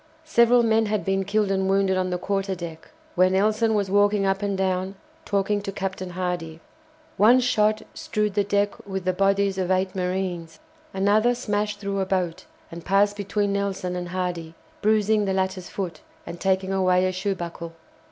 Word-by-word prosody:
Several 240 -5 +4
men 225 -1 +2
had 210 0 -1
been 195 0 +1
killed 205 0 +1
and 190 0 0
wounded 195 -1 +2
on 185 0 0
the 180 - -1
quarter 195 +1 -2
deck, 165 -2 -8 0.2
where 185 +1 +4
Nelson 215 +4 +2
was 200 -2 0
walking 205 0 +3
up 195 +1 0
and 200 -1 -1
down 190 0 -1 0.3
talking 205 +1 0
to 200 - -5
Captain 190 -1 -4
Hardy. 175 -3 -4 0.6
One 235 +5 +6
shot 215 -3 +2
strewed 210 -1 -2
the 205 0 +2
deck 205 0 -1
with 190 -2 -4
the 185 - +1
bodies 195 0 +1
of 185 -1 -1
eight 185 0 +1
marines. 180 -3 -3 0.3
Another 210 +5 +2
smashed 210 -3 -2
through 200 -1 -3
a 190 - -1
boat, 180 -3 -2 0.3
and 170 0 -8
passed 200 +2 +2
between 205 0 -1
Nelson 195 -2 -2
and 175 -1 -4
Hardy, 175 -3 -4 0.3
bruising 215 0 +2
the 195 - 0
latter's 190 -1 -2
foot, 185 -4 -5 0.2
and 170 - -8
taking 190 0 +1
away 185 -1 +3
a 185 - +1
shoe 190 +2 -2
buckle. 170 -1 -7
195 Hz, 180 wpm, -24 LUFS, 185-205 Hz, 0.6 s, One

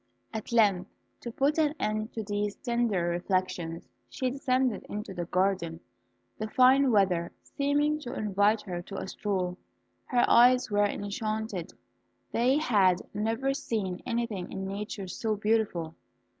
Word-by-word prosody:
At 220 0 -5
length, 205 -5 +3 0.3
to 235 - -6
put 285 +6 +1
an 305 -1 +2
end 215 +1 -1
to 220 - -3
these 205 0 -2
tender 235 -8 0
reflections, 175 -2 -2 0.2
she 255 -1 -2
descended 255 -4 0
into 210 -1 -5
the 175 -2 -4
garden, 180 -2 0 0.6
the 215 - -2
fine 260 +4 +5
weather 185 -5 +2
seeming 290 +2 0
to 255 -3 -6
invite 210 0 +2
her 175 -3 -4
to 195 +3 -8
a - - -4
stroll. 185 -3 -2 0.5
Her 245 -2 +3
eyes 250 -1 +5
were 205 0 +3
enchanted; 205 -2 -3 0.6
they 250 +4 +3
had 200 - +3
never 225 +6 0
seen 200 -9 -3
anything 230 -6 -3
in 190 0 -4
nature 200 0 -5
so 215 +4 -2
beautiful. 205 -6 0
210 Hz, 140 wpm, -29 LUFS, 190-240 Hz, 0.6 s, fine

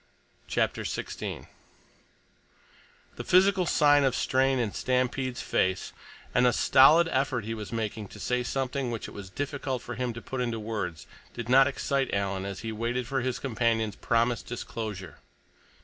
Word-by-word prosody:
CHAPTER - - 0
XVI - - -5 1.7
The - - -4
physical 185 0 +4
sign 145 -1 +5
of 135 - +2
strain 130 0 +2
in 115 -5 -1
Stampede's 130 0 -1
face, 95 0 0 0.4
and 125 0 +4
the 120 - +3
stolid 155 +6 +6
effort 130 -5 0
he 115 - -3
was 105 -4 -7
making 110 -2 -3
to - - -12
say 125 0 0
something 130 +1 -2
which 115 -2 -4
it - - -11
was 100 -2 -8
difficult 135 +1 -3
for 120 - -6
him 125 +1 -2
to 115 - -7
put 130 +2 -5
into 120 -2 -2
words, 105 -7 -4 0.3
did 120 -1 -5
not 135 +2 +7
excite 140 -1 -1
Alan 100 -1 -1
as 100 -1 -5
he 115 - -4
waited 120 +3 -2
for 135 +2 -1
his 130 0 -1
companion's 115 -4 0
promised 115 +1 0
disclosure. 110 -6 -6
125 Hz, 160 wpm, -28 LUFS, 110-135 Hz, 1.7 s, not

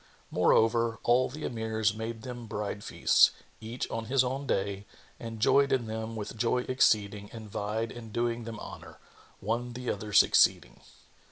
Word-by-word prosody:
Moreover, 115 0 +3
all 125 +2 +3
the 150 +4 -7
Emirs 110 -2 -1
made 110 0 -6
them 120 -2 -7
bride 105 -1 -4
feasts, - - +4 0.3
each 115 +3 -5
on 115 0 -3
his 130 +2 +3
own 135 +2 -3
day, 100 -1 -2 0.3
and 115 -1 -7
joyed 140 +5 +4
in 125 -3 +1
them 110 +1 -5
with 105 0 -6
joy 120 +2 0
exceeding 105 -5 +1
and 110 -3 -10
vied 110 +3 -2
in 115 -2 -10
doing 120 0 -1
them 115 -2 -7
honour, - - -10 0.4
one 120 +4 -2
the 125 0 -3
other 105 +1 -6
succeeding. - - +4
115 Hz, 160 wpm, -29 LUFS, 110-120 Hz, 0.4 s, feasts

